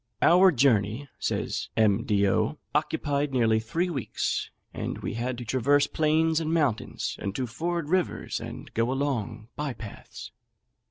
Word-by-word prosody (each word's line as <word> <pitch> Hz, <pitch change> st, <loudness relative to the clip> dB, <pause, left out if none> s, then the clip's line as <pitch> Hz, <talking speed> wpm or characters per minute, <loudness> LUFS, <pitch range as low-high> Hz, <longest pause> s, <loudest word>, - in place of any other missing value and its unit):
"Our 180 Hz, +2 st, +7 dB
journey," 120 Hz, -, +2 dB
says -, -, -2 dB
M. 110 Hz, 0 st, +3 dB
D'O., 105 Hz, +5 st, +2 dB, 0.2 s
"occupied 145 Hz, -1 st, 0 dB
nearly 115 Hz, -4 st, +3 dB
three 165 Hz, +11 st, -1 dB
weeks; 135 Hz, -8 st, -2 dB, 0.2 s
and -, -, -4 dB
we -, -, -4 dB
had 120 Hz, +2 st, -2 dB
to 120 Hz, -, -6 dB
traverse 140 Hz, +4 st, +3 dB
plains 160 Hz, +1 st, +2 dB
and 160 Hz, -1 st, -2 dB
mountains, 145 Hz, -9 st, 0 dB
and 100 Hz, 0 st, -4 dB
to 130 Hz, -, -1 dB
ford 165 Hz, +7 st, -3 dB
rivers, 185 Hz, +2 st, 0 dB
and -, -, -8 dB
go 115 Hz, +2 st, +1 dB
along 120 Hz, -5 st, -2 dB
by 150 Hz, -3 st, -3 dB
paths. 110 Hz, -4 st, -10 dB
135 Hz, 145 wpm, -27 LUFS, 115-155 Hz, 0.2 s, Our